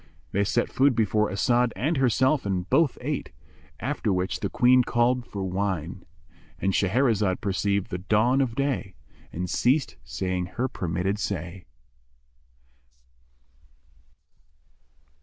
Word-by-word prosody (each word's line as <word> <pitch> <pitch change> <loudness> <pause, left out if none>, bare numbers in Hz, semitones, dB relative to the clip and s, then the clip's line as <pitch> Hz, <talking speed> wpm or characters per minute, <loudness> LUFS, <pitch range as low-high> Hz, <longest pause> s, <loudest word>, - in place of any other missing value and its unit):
They 100 - +1
set 120 +4 +1
food 135 -1 +3
before 105 -1 +1
As'ad 120 +5 +1
and 145 - 0
herself 130 +3 +2
and 90 -2 -2
both 140 +3 +2
ate, 145 +3 -3 0.5
after 120 -3 -1
which 90 0 -1
the - - -2
Queen 125 +1 +4
called 120 +1 +1
for 100 -2 -5
wine.—And 90 -1 -4
Shahrazad 105 -2 +2
perceived 100 0 -1
the 90 - -3
dawn 110 +8 +2
of 120 -4 -1
day 135 -9 -2 0.4
and 90 +2 -4
ceased 130 - +1
saying 90 -1 -3
her 130 - +1
permitted 90 0 -2
say. 90 -2 -4
105 Hz, 115 wpm, -26 LUFS, 95-125 Hz, 0.5 s, Queen